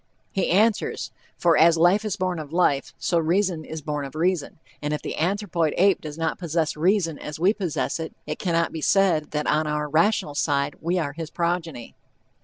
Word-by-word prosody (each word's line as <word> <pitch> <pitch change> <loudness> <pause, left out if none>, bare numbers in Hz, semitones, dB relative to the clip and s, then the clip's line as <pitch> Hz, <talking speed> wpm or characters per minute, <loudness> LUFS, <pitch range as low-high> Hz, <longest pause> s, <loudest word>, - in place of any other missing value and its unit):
He 195 - 0
answers, 215 +4 +1 0.3
"for 170 -2 +3
as 165 +2 +5
life 175 +6 +4
is 215 -3 -2
born 185 -3 -2
of 150 -2 -8
life, 160 -5 +1
so 170 - +1
reason 170 0 +1
is 160 -1 -7
born 150 -1 -3
of 135 0 -8
reason, 170 -1 0 0.2
and 150 0 -1
if - - -7
the - - -4
anthropoid 175 -2 0
ape 195 0 +4
does 155 -1 -7
not 165 -1 -2
possess 165 -2 -1
reason 170 -1 +1
as 150 +1 -7
we 185 +5 +4
possess 180 -6 -2
it, 160 - -6
it - - -5
cannot 170 -2 0
be 160 - -5
said 175 -4 +2
that 150 0 -2
on 155 +1 +1
our 150 0 -1
rational 160 +1 +2
side 145 -1 0
we 175 +3 0
are 150 -5 -2
his 160 0 -6
progeny." 170 -8 -3
165 Hz, 200 wpm, -24 LUFS, 150-180 Hz, 0.3 s, as